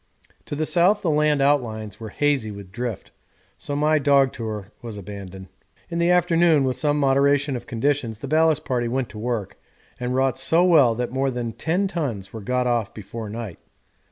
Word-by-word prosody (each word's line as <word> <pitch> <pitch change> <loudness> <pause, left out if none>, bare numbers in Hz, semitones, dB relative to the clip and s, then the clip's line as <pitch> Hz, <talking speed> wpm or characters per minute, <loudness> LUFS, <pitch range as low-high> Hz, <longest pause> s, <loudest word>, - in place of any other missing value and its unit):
To - - -5
the 155 +2 -1
south 180 +6 +3
the 165 - +2
land 150 -2 +2
outlines 110 -8 0
were 110 -1 -7
hazy 140 -2 0
with 100 -2 -9
drift, 115 -2 -5 0.5
so 145 - -4
my 155 +1 +2
dog 140 -2 +3
tour 110 -4 -6
was 115 -3 -7
abandoned. 95 -1 -9 0.4
In 170 - -2
the 170 +1 +2
afternoon, 170 -4 +4
with 130 -1 0
some 150 -1 0
moderation 140 0 +2
of 120 -1 -7
conditions, 125 -2 -1
the 140 - -7
ballast 155 +1 +2
party 120 -3 -1
went 125 +1 -2
to 105 - -9
work, 110 -4 -3 0.4
and 125 +1 -2
wrought 130 0 +1
so 165 +2 +4
well 145 -10 +5
that 120 +1 -3
more 135 +1 0
than 120 -3 -4
10 180 - 0
tons 120 - -4
were 110 - -6
got 125 +4 0
off 120 -4 -1
before 105 +1 -7
night. 110 -4 -6
130 Hz, 185 wpm, -23 LUFS, 110-150 Hz, 0.5 s, well